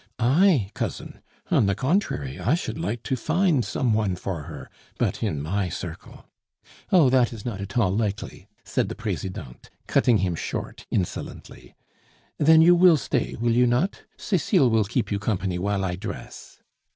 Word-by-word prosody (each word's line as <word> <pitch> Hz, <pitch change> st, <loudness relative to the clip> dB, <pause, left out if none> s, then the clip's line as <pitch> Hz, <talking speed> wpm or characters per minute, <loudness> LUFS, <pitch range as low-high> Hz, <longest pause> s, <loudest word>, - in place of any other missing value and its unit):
"I, 130 Hz, -, +3 dB
cousin? -, -, -5 dB, 0.3 s
On 100 Hz, -, +4 dB
the 100 Hz, -, +1 dB
contrary, 120 Hz, -, -1 dB
I 135 Hz, -, +2 dB
should 170 Hz, -, -4 dB
like 120 Hz, -7 st, -3 dB
to 130 Hz, -, -1 dB
find 160 Hz, 0 st, +1 dB
some 120 Hz, -1 st, 0 dB
one 105 Hz, -4 st, +1 dB
for 90 Hz, -4 st, -5 dB
her; -, -, -9 dB, 0.3 s
but -, -, -1 dB
in 75 Hz, -, -1 dB
my 95 Hz, +4 st, -1 dB
circle 85 Hz, -1 st, -8 dB, 0.3 s
" -, -, -26 dB
"Oh, 160 Hz, -9 st, +5 dB
that 125 Hz, -3 st, +3 dB
is 110 Hz, -4 st, -9 dB
not 105 Hz, -5 st, -4 dB
at 100 Hz, +3 st, -6 dB
all 100 Hz, -5 st, +2 dB
likely," 105 Hz, -2 st, -3 dB, 0.2 s
said -, -, -1 dB
the -, -, -5 dB
Presidente, 75 Hz, -9 st, -6 dB, 0.2 s
cutting 120 Hz, -3 st, +3 dB
him 90 Hz, -2 st, 0 dB
short 80 Hz, -, -5 dB
insolently. 75 Hz, -8 st, -5 dB, 0.6 s
"Then 160 Hz, +2 st, +6 dB
you 175 Hz, +2 st, +7 dB
will 175 Hz, -2 st, +6 dB
stay, 130 Hz, -3 st, -2 dB
will 120 Hz, 0 st, +1 dB
you 125 Hz, +1 st, +4 dB
not? 125 Hz, +12 st, 0 dB, 0.2 s
Cecile 140 Hz, -, +2 dB
will 110 Hz, -2 st, +3 dB
keep 115 Hz, +3 st, -2 dB
you 100 Hz, -, 0 dB
company 95 Hz, -4 st, -2 dB
while 100 Hz, +1 st, -1 dB
I 90 Hz, -1 st, -3 dB
dress. -, -, -9 dB
110 Hz, 170 wpm, -24 LUFS, 95-135 Hz, 0.6 s, you